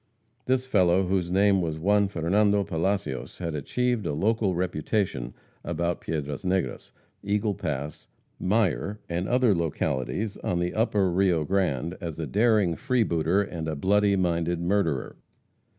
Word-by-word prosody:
This 130 0 +1
fellow, 95 -6 +3
whose 90 -1 0
name 100 +1 +3
was 80 -2 -2
Juan 100 +4 +3
Fernando 100 +3 +2
Palacios, 95 -3 -2
had 85 -3 -4
achieved 120 - -1
a - - -1
local 100 +3 +1
reputation 90 - -2 0.3
about 85 0 -2
Piedras 75 +2 -4
Negras, 90 -8 -2 0.3
Eagle 105 +1 0
Pass, 75 -5 -5 0.3
Mier, 105 0 0
and 85 +2 -2
other 125 -3 +4
localities 85 - -2
on 90 - -2
the 85 0 -1
upper 105 -4 +1
Rio 90 -3 +2
Grande, 85 -3 0
as 85 -4 -5
a 80 - -3
daring 105 -3 +2
freebooter 100 -8 +1
and 80 -6 -5
bloody 100 +3 +3
minded 85 -2 0
murderer. 85 -6 0
90 Hz, 135 wpm, -26 LUFS, 80-105 Hz, 0.3 s, other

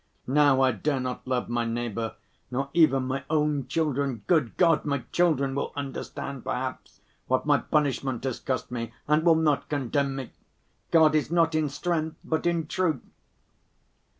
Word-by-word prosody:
Now 140 0 +4
I 130 -1 +4
dare 135 +6 -1
not 125 0 -4
love 130 -1 0
my 120 0 0
neighbor 115 -1 -3 0.3
nor 135 +2 -3
even 135 -6 +4
my 130 +1 -3
own 150 -4 +1
children. 140 -6 -1
Good 155 -9 +1
God, 165 -3 +4
my 140 -4 -1
children 150 -6 +2
will 140 - -2
understand, 140 -1 -5
perhaps, 130 +1 -5 0.3
what 130 0 +1
my 145 -1 +4
punishment 135 -4 0
has 130 -3 -2
cost 130 -2 -3
me 115 -2 -4 0.2
and 150 +1 +3
will 165 -1 +6
not 155 -3 +1
condemn 140 0 0
me! 135 -2 -6 0.6
God 160 -2 +5
is 155 -2 +1
not 165 -1 +2
in 155 -2 +1
strength 160 +1 -2
but 160 +1 -1
in 170 -2 +1
truth." 160 -4 -1
140 Hz, 160 wpm, -27 LUFS, 130-155 Hz, 0.6 s, will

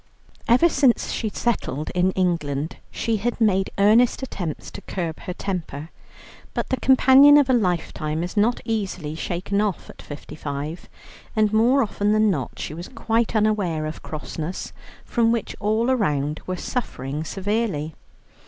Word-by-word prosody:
Ever 250 +9 +6
since 270 -7 +2
she 220 - -2
settled 205 - -2
in 180 +1 +2
England, 160 -5 -1
she 225 -1 -1
had 240 +4 -2
made 195 -4 +2
earnest 225 +6 +4
attempts 175 - -5
to - - -9
curb 170 -4 -4
her 180 - -5
temper. 165 -6 -5 0.6
But - - -2
the 260 - 0
companion 265 +2 +7
of 275 -3 +4
a - - +4
lifetime 170 -6 0
is 180 - -5
not 220 +4 +2
easily 190 -9 -2
shaken 185 +5 -2
off 205 -4 -2
at - - -14
fifty 145 0 -9
five, 150 +3 -5 0.5
and 215 -1 +2
more 245 +5 +4
often 205 -1 0
than 215 -1 +4
not 135 -9 -3
she - - -5
was 170 +3 -7
quite 230 -2 -1
unaware 205 -8 +1
of 155 0 -6
crossness, 155 +3 -5 0.3
from 230 -2 +2
which 230 -2 -2
all 220 +4 +1
around 150 - 0
were 185 0 -2
suffering 150 - -4
severely. 195 -4 -2
200 Hz, 155 wpm, -23 LUFS, 160-230 Hz, 0.6 s, companion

